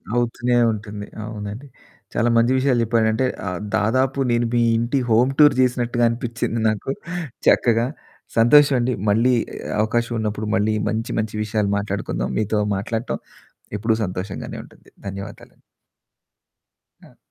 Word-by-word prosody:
అవుతూనే 120 0 +1 0.2
ఉంటుంది, 105 -1 -7 0.2
అవునండి. 110 +4 -7 0.5
చాలా 120 - +2
మంచి 120 +2 +4
విషయాలు 130 -3 +2
చెప్పాడంటే, 115 +2 +1 0.2
ఆహ్, 90 -1 -3 0.2
దాదాపు 130 +5 +1
నేను 120 0 +2
మీ 120 - +3 0.2
ఇంటి 120 +4 0
హోమ్ 120 +4 +4
టూర్ 145 -3 +7
చేసినట్టుగా 120 -1 +1
అనిపించింది 115 -1 -3
నాకు, 110 +5 -2 0.6
చక్కగా. 115 0 +4 0.5
సంతోషం 140 +4 +6
అండి, 125 +1 0 0.2
మళ్ళీ 115 +5 +3 0.5
అవకాశం 115 +2 0
ఉన్నప్పుడు, 105 0 -2
మళ్ళీ 110 0 +1
మంచి 110 +2 -2
మంచి 110 0 -3
విషయాలు 105 -1 -1
మాట్లాడుకుందాం, 100 -12 -3
మీతో 105 0 0 0.2
మాట్లాడటం 115 +4 -3 0.6
ఎప్పుడూ 110 +2 +1
సంతోషంగానే 95 +1 -5
ఉంటుంది. - - -20 0.2
ధన్యవాదాలండి. 100 +1 -9 1.4
ఆ! - - -20
115 Hz, 120 wpm, -21 LUFS, 105-120 Hz, 1.4 s, టూర్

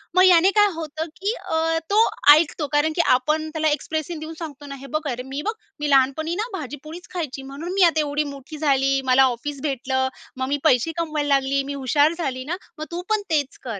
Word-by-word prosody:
मग 370 - +6
याने 365 +1 +6
काय 415 -1 +5
होतं 315 0 -4 0.2
की 410 +3 0
अ, 325 0 0
तो 435 +3 +4 0.3
ऐकतो. 305 -1 +1
कारण 295 +2 +3
की 345 - +3 0.2
आपण 310 +4 -1
त्याला 315 0 -1
एक्सप्रेशन 310 +2 -3
देऊन 310 +1 -7
सांगतो 295 -3 -8
ना. 275 -1 -7
हे 275 +1 -11
बघ - - -5
अरे 250 +1 -5
मी 270 +2 -5
बघ, 435 - 0 0.3
"मी 295 0 -1
लहानपणी 275 +5 +2
ना 465 - -4
भाजीपोळीच 305 +5 -9
खायची. 300 -6 -4
म्हणून 285 +7 -6
मी 390 - +4
आता 330 -2 +4
एवढी 295 0 0
मोठी 280 +3 -10
झाली, 275 -2 +2
मला 260 +1 +5
ऑफिस 290 +2 -6
भेटलं, 265 -2 -1 0.3
मग 260 0 -2
मी 285 +1 0
पैसे 250 +6 +3
कमवायला 310 -3 -1
लागली. 275 0 +2
मी 280 +1 -5
हुशार 285 +4 +2
झाली 260 -6 -3
ना, 335 - -2 0.2
मग 310 - -5
तू 345 +1 -3
पण 435 -1 +2
तेच 290 -4 0
कर." 225 -6 -5
300 Hz, 215 wpm, -23 LUFS, 275-325 Hz, 0.3 s, मग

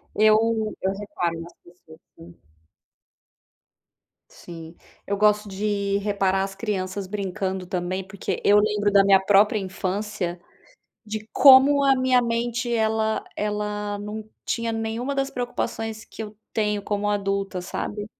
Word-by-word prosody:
Eu 215 0 +5 0.4
eu 190 - 0
reparo 175 -5 -3
nas 170 +1 -11
pessoas, 165 -2 -18 0.2
sim. 170 +1 -14 2.0
Sim, 165 -1 -11 0.3
eu 200 - -1
gosto 210 0 +3
de 200 0 -1
reparar 195 -2 +1
as 195 0 -5
crianças 195 -2 -3
brincando 190 -2 -3
também, 185 0 -2
porque 190 0 -4
eu 205 +1 +6
lembro 210 -1 +1
da 200 -1 +6
minha 195 -1 +6
própria 205 +2 +4
infância, 190 -1 -3 0.7
de 215 0 -6
como 280 +1 +7
a 270 -1 +5
minha 255 -1 +3
mente, 235 +1 -1
ela 220 -1 0
ela 210 0 -2
não 210 +1 -6 0.2
tinha 230 -1 -1
nenhuma 225 +4 -3
das 275 0 -1
preocupações 225 -3 -4
que - - -8
eu 210 -1 -9 0.2
tenho 210 -2 0
como 205 0 -2
adulta, 195 -2 -1
sabe. 205 +3 -5
205 Hz, 130 wpm, -24 LUFS, 195-220 Hz, 2.0 s, como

